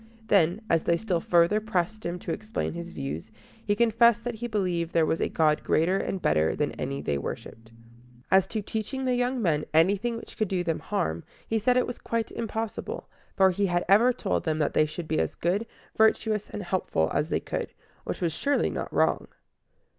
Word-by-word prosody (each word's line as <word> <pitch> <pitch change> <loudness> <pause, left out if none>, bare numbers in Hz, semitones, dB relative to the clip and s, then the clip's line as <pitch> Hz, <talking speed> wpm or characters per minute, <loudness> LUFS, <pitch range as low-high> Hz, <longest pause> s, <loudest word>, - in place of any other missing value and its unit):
Then, 185 +1 +3
as 165 -4 +3
they 170 - +2
still 185 -4 -1
further 170 +5 +3
pressed 215 0 -2
him 175 +1 -3
to 170 - -2
explain 215 +1 -3
his 170 +1 -6
views, 75 +4 -5 0.3
he 205 - +1
confessed 235 0 +4
that 245 - -2
he 235 +2 -5
believed 180 -6 -1
there 165 -1 +4
was 160 - 0
a - - +1
God 155 -1 +2
greater 180 +5 +2
and 190 - -2
better 80 - +2
than - - 0
any 70 +1 -4
they 70 -1 -1
worshiped. 115 +9 -7 0.6
As 190 0 +5
to 215 0 -3
teaching 225 +6 -3
the 255 - +2
young 245 +1 0
men 160 -8 +1
anything 200 +8 +3
which - - -11
could 215 - +1
do 185 -1 -1
them 165 -2 -1
harm, 85 - -2 0.2
he 225 - +1
said 250 +4 +3
it 250 - +3
was 245 - -6
quite 230 -1 -2
impossible; 225 -1 -4 0.3
for 190 -1 +6
he 200 +2 0
had 175 -1 0
ever 225 +6 +6
told 230 -5 -1
them 155 -2 0
that 150 -2 0
they 155 - +3
should 165 +2 -6
be 155 - 0
as - - -1
good, 195 +7 0 0.3
virtuous, 220 -1 +2
and 210 - -5
helpful 175 - 0
as 150 +3 0
they - - +1
could, - - -4 0.3
which - - -5
was 170 -3 0
surely 285 - +1
not - - -4
wrong. - - +1
190 Hz, 205 wpm, -27 LUFS, 165-220 Hz, 0.6 s, for